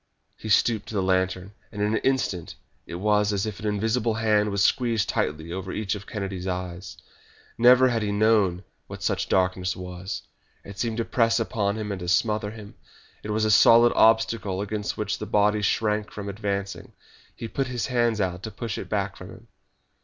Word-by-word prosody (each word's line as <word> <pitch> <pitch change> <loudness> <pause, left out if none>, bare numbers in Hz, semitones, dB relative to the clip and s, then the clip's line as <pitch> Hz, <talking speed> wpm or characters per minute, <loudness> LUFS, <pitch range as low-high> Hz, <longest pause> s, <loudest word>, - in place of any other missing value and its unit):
He 110 - -8
stooped 110 +1 +2
to 110 - -7
the 95 - +1
lantern, 95 0 0 0.2
and 105 - -8
in 105 0 +1
an - - +1
instant 115 -10 -1 0.3
it 85 - -6
was 105 +2 +2
as 100 0 -1
if 105 -2 -5
an 110 - -4
invisible 110 +2 0
hand 105 -2 +2
was 100 -1 +1
squeezed 115 -5 +1
tightly 80 +3 -2
over 95 0 -5
each 105 -2 -2
of 100 -2 -7
Kennedy's 95 -3 -5
eyes. 90 0 -5 0.6
Never 125 +2 +6
had 115 -2 0
he 105 -1 -1
known 100 -4 +2 0.2
what - - -9
such - - -1
darkness 90 0 +1
was. 90 +2 -6 0.4
It 100 0 -11
seemed 115 -1 -2
to 115 - -1
press 115 -1 +2
upon 105 -2 -1
him 105 -1 -4
and 100 - -4
to 90 - -6
smother 105 +3 +1
him. 105 -1 -11 0.5
It 105 - -8
was 110 +1 +1
a 110 - +2
solid 115 +3 +6
obstacle 110 -3 +3
against 105 +1 -3
which 105 -1 -2
the 105 - -5
body 105 0 +2
shrank 105 0 0
from 100 -1 -7
advancing. 100 -1 -4 0.4
He 115 - -6
put 135 +3 -2
his 125 -2 -2
hands 120 -4 +1
out 90 -2 -1
to 110 - -5
push 110 0 -5
it - - -8
back 100 -2 -1
from 90 - -11
him. 115 +3 -14
105 Hz, 195 wpm, -25 LUFS, 95-110 Hz, 0.6 s, Never